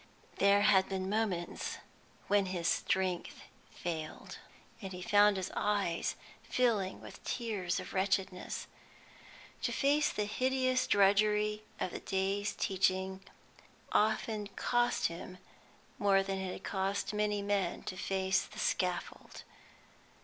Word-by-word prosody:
There 200 +1 +5
had 195 -2 +5
been 190 0 -2
moments 205 -6 -1 0.5
when 200 -1 +3
his 175 -2 -2
strength 185 -2 0 0.3
failed, 160 -3 -6 0.4
and 195 -2 -6
he 180 - -7
found 205 +1 +5
his 190 0 -3
eyes 200 -5 0 0.3
filling 215 -7 0
with - - -11
tears 205 -7 -2
of - - -8
wretchedness. 190 -1 -1 1.0
To - - 0
face 295 +2 +2
the 210 - -1
hideous 255 +3 +1
drudgery 210 +1 +3 0.2
of 185 - -1
the - - -5
day's 195 +1 -1
teaching 190 0 0 0.7
often 215 0 +1
cost 240 +4 +1
him 175 +2 -4 0.6
more 195 -2 +4
than 195 0 -3
it 190 -1 -3
had - - -8
cost 195 +1 -1
many 210 -1 0
men 200 -3 0
to - - -5
face 190 0 +1
the 215 - -10
scaffold. 180 -4 -2
195 Hz, 120 wpm, -33 LUFS, 190-210 Hz, 1.0 s, There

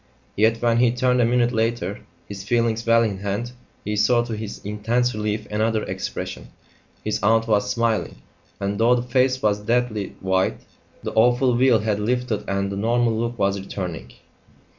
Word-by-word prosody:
Yet, 110 +2 +3
when 115 -1 +3
he 120 0 +4
turned 125 0 +2
a - - +4
minute 120 0 +2
later, 110 -4 -1 0.3
his 100 -1 -7
feelings 115 +1 0
well 115 0 +5
in 100 -4 -2
hand, 100 +5 -3 0.3
he 105 +1 -2
saw 120 +3 +3
to 115 -2 -4
his 105 -1 -6
intense 115 +4 0
relief 105 0 -2
another 110 +1 0
expression; - - -5 0.6
his - - -2
aunt 115 +3 +3
was 105 -2 +1
smiling, 115 -1 0 0.4
and 100 +1 -2
though 120 +2 +5
the 120 - -1
face 130 +1 +1
was 105 -1 +2
deathly 115 -1 -1
white, 95 0 0 0.5
the - - -4
awful 125 +3 +3
veil 125 -1 +4
had 105 0 -1
lifted 120 -1 -1
and 100 0 -1
the 100 - -4
normal 115 +2 +1
look 120 +1 -2
was 100 -1 +1
returning. 90 -10 -6
110 Hz, 170 wpm, -23 LUFS, 105-120 Hz, 0.6 s, well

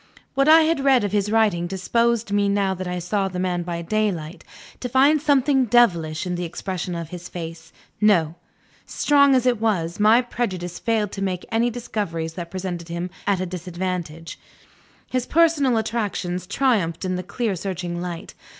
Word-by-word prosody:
What 275 +2 +3
I 320 +1 +8
had 320 -1 +2
read 265 -4 +4
of 205 - -1
his 205 0 0
writing 210 -6 +2
disposed 230 +4 0
me, 205 0 +2
now 200 -1 +1
that 185 0 -5
I 180 0 -3
saw 195 +3 -1
the 185 -1 -6
man 180 -1 -1
by 170 -1 -4
daylight, 180 -5 -2 0.4
to 250 - -4
find 275 +4 +4
something 280 -2 +3
devilish 175 -10 +2
in 180 - -2
the 175 0 -3
expression 175 +1 -4
of 165 -2 -5
his 175 0 -8
face. 165 -1 -8 0.3
No! 175 -7 +3 0.5
strong 280 -2 +4
as 255 -1 +2
it 240 -3 +2
was, 175 -6 0
my 220 +4 +5
prejudice 185 -8 -4
failed 220 -3 0
to 195 - -6
make 185 -2 -2
any 230 +2 +2
discoveries 200 -9 -4
that 170 -1 -6
presented 180 -2 -5
him 170 +1 -4 0.2
at 200 -2 +2
a - - -1
disadvantage. 175 -2 -5 0.7
His 255 -1 -1
personal 305 -7 +3
attractions 205 -5 -2
triumphed 200 -8 0
in 185 0 -1
the 180 - -2
clear 200 +3 -2
searching 175 -1 -4
light. 175 -2 -6
190 Hz, 175 wpm, -23 LUFS, 175-235 Hz, 0.7 s, I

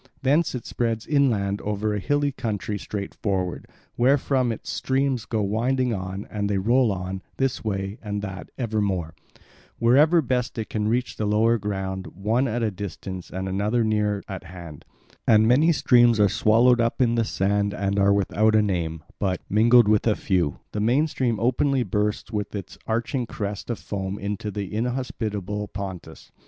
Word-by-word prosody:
Thence 145 +3 +2
it 120 - -5
spreads 115 -2 -2
inland 110 -9 +1
over 105 +1 -1
a 105 - -1
hilly 145 +6 +1
country 105 -5 -3
straight 100 0 -5
forward; 95 -4 -2 0.3
wherefrom 130 0 +2
its 110 - -6
streams 130 -4 0
go 110 +1 -1
winding 120 +5 0
on, 95 0 -5
and 100 -1 -2
they 100 - +1
roll 120 +4 +3
on, 95 0 -4 0.2
this 135 -1 -1
way 100 -1 -3
and 105 -2 -4
that 95 -2 -6
ever 110 -4 -1
more, 90 -6 -1 0.6
wherever 150 +8 +5
best 125 -1 -1
they 110 -3 -3
can 105 -1 -2
reach 120 +3 -1
the 105 - -1
lower 110 +3 +3
ground, 95 -2 -3
one 110 +7 +1
at 120 0 -1
a 110 - +1
distance 95 -1 -7
and 95 +1 -4
another 105 +5 0
near 105 -2 0
at 95 -2 -7
hand; 85 -4 -10 0.4
and 110 -1 +5
many 145 +8 +5
streams 120 -6 +4
are 105 - +6
swallowed 115 +5 +4
up 115 0 0
in 120 -3 +3
the 115 -1 +2
sand 100 0 0
and 100 0 -1
are 100 0 +4
without 105 +2 +2
a 110 - +5
name; 85 -5 -2 0.2
but, 95 -3 0
mingled 115 +2 +6
with 105 +1 +3
a 110 - +3
few, 90 -7 0
the 105 - -3
main 125 +8 +3
stream 125 -7 -1
openly 130 +2 +2
bursts 105 +2 -1
with 105 -1 -3
its 100 -3 -6
arching 120 +2 -1
crest 105 0 -5
of 120 - -1
foam 95 -1 -4
into 105 +1 -4
the 100 -1 -5
inhospitable 105 -4 -3
Pontus. 95 -6 -8
105 Hz, 175 wpm, -24 LUFS, 100-120 Hz, 0.6 s, are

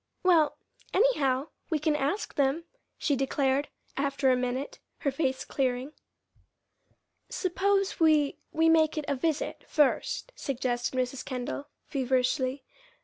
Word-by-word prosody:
"Well, 335 -5 +4 0.4
anyhow, 295 - +2 0.2
we 320 - +2
can 305 0 +1
ask 295 +8 -1
them," 280 +4 +1 0.3
she 290 - +1
declared, 270 +1 +1 0.3
after 275 -1 +2
a - - +4
minute, 250 +2 -3 0.2
her 280 - +1
face 265 -2 -1
clearing. 260 +1 -1 1.4
"Suppose 390 0 0
we 310 -3 +3
we 320 +1 +3
make 320 -1 +4
it 305 - -2
a 280 - +1
visit, 310 +3 -1
first," 300 - +1
suggested 255 -2 -2
Mrs. 255 +1 -1
Kendall, 255 +2 -4 0.2
feverishly. 260 0 0
280 Hz, 120 wpm, -29 LUFS, 260-315 Hz, 1.4 s, Well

